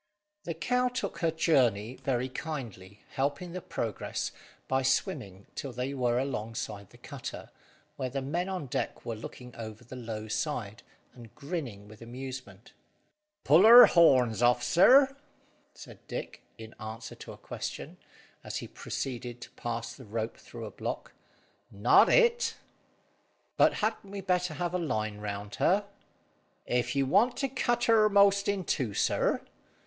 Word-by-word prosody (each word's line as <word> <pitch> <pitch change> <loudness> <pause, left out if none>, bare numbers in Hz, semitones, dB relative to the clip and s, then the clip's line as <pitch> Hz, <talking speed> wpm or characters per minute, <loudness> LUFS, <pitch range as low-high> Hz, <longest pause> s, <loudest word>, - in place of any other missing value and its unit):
The 170 - -3
cow 250 +9 +1
took 250 0 -4
to - - -1
her - - +2
journey 125 - +2
very 130 -1 -1
kindly, 115 - -7
helping 145 +6 -2
the 185 +1 -5
progress 115 -9 -3 0.4
by 130 0 +1
swimming 130 - -1
till 135 - -5
they 125 +3 -3
were 120 -3 +1
alongside 110 -6 -4
the - - -17
cutter, - - -8 0.5
where 130 - -2
the 135 +2 -3
men 170 +7 -2
on 185 -6 -3
deck 125 - -4
were 115 - -3
looking 125 +2 -9
over 110 0 -8
the 120 +2 -10
low 110 -3 -6
side, 110 -3 -3 0.3
and 120 -3 -14
grinning 140 - -5
with 110 +1 -14
amusement. 125 -4 -8 0.7
"Pull 155 +6 +6
her 240 +3 +11
horns 130 -10 +4
off, 120 0 +4
sir!" 265 - +6 0.6
said - - -12
Dick, - - -6 0.2
in 110 0 -10
answer 110 0 -7
to - - -10
a - - -13
question, - - -6 0.5
as - - -4
he - - -6
proceeded 125 -2 -5
to - - -10
pass 115 -1 -4
the 130 - -12
rope 110 +2 -3
through - - -10
a - - -7
block, - - -5 0.6
"not - - +5
it." 475 -1 +3 1.0
"But - - +5
hadn't 215 -2 -3
we 200 0 -6
better 180 -3 0
have 175 +3 -2
a 180 - 0
line 110 -9 -2
round 100 0 -5
her?" 200 +3 +3 0.8
"If 125 +3 0
you 140 -1 +2
want 225 - +3
to 275 - 0
cut 240 -2 0
her 220 -2 +5
'most 200 -1 +4
in 200 -2 0
two, 120 -11 -1
sir. - - +1
130 Hz, 155 wpm, -29 LUFS, 115-180 Hz, 1.0 s, her